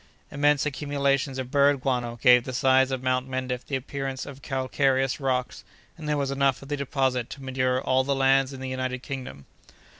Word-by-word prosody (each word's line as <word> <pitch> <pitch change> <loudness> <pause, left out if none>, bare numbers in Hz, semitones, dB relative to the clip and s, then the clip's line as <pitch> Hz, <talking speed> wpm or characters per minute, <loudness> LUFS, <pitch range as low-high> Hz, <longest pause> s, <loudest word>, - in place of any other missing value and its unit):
Immense 145 0 +2
accumulations 140 -2 -1
of 130 -1 -5
bird 140 -1 +3
guano 120 -3 -1
gave 125 -1 +7
the 130 - -6
sides 130 +1 +3
of 130 -1 -3
Mount 130 0 0
Mendif 130 -1 -3
the 140 - -4
appearance 135 0 -4
of 140 -1 -10
calcareous 135 +1 0
rocks, 130 -2 -2 0.3
and 155 -3 -7
there 150 - +1
was 140 -1 -1
enough 135 -1 +1
of 135 - -12
the 145 - 0
deposit 130 -3 -1
there - - -6
to 140 - -13
manure 130 -1 0
all 130 0 +2
the 140 +1 0
lands 135 0 +3
in 135 -1 -9
the 130 - -4
United 130 0 -3
Kingdom. 130 - -7
130 Hz, 200 wpm, -26 LUFS, 130-140 Hz, 0.3 s, gave